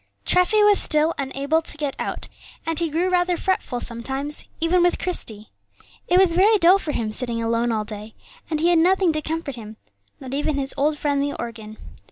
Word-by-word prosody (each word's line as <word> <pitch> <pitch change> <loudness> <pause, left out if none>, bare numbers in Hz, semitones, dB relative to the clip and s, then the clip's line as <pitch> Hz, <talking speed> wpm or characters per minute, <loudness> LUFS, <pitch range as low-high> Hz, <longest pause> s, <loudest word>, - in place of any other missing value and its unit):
Treffy 360 +4 +3
was 415 -1 +5
still 310 +1 +3
unable 280 +4 -1
to 315 - -1
get 290 -3 -3
out, - - -4 0.4
and 325 0 -1
he 335 -1 -1
grew 335 +4 0
rather 355 -1 +1
fretful 375 -10 -2
sometimes, 265 +6 -2
even 335 +2 +2
with 350 0 +2
Christie. 220 - -3 0.6
It 355 - +3
was 375 -3 +4
very 410 +5 +4
dull 365 +1 +5
for 310 - -4
him 220 -6 -3
sitting 235 0 -1
alone 230 +1 0
all 215 -1 -2
day; 215 0 -9 0.3
and 310 -2 -1
he 335 +3 +2
had 345 -2 +4
nothing 365 0 +3
to 310 - -2
comfort 315 -4 -4
him, 215 -1 -10 0.4
not 260 -1 -8
even 295 +1 -1
his 270 -1 -1
old 295 +2 0
friend 285 -1 0
the 285 0 -2
organ. 220 -2 -7
300 Hz, 200 wpm, -22 LUFS, 240-345 Hz, 0.6 s, was